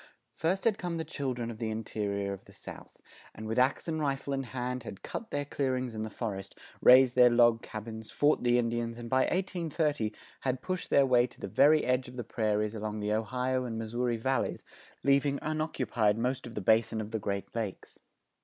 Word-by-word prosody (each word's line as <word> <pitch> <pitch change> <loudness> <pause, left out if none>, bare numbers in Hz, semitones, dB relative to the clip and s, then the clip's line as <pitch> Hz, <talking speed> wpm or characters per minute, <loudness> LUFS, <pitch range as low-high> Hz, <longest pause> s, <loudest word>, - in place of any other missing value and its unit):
First 185 +4 0
had 215 -3 +2
come 175 -3 -3
the 160 - -2
children 125 -4 -3
of 110 - -10
the 115 -2 -2
interior 100 -2 -2
of 95 - -10
the - - -16
South, - - -11 0.3
and 110 - -7
with 115 +3 0
ax 130 +6 +2
and 160 -1 -1
rifle 140 -1 -1
in 135 - 0
hand 125 +1 -3
had 105 -4 -9
cut 225 - -6
their 145 0 -2
clearings 130 -4 -1
in 110 - -4
the 110 - -3
forest, 105 -4 -5 0.2
raised 125 0 +8
their 125 -1 +7
log 120 -1 +5
cabins, 110 0 -7
fought 145 +1 +2
the 120 0 +3
Indians 115 -1 -1
and 120 -1 -8
by 130 - +4
1830 160 - -1 0.3
had 130 -1 -2
pushed 185 -1 -3
their 140 - +5
way 125 -2 +4
to - - -18
the - - -4
very 150 +10 +5
edge 125 +1 +1
of 125 - -11
the 120 - -3
prairies 105 -1 0
along 110 -1 -4
the 105 0 -1
Ohio 125 +4 0
and 115 -3 -4
Missouri 120 +2 -1
Valleys, 130 +4 -1 0.4
leaving 140 0 +3
unoccupied 150 -9 0
most 125 +2 -1
of 115 - -10
the 105 - -2
Basin 110 +2 +3
of 110 0 -5
the 110 - -1
Great 100 -1 -3
Lakes. 110 -5 -5
120 Hz, 200 wpm, -30 LUFS, 110-135 Hz, 0.4 s, raised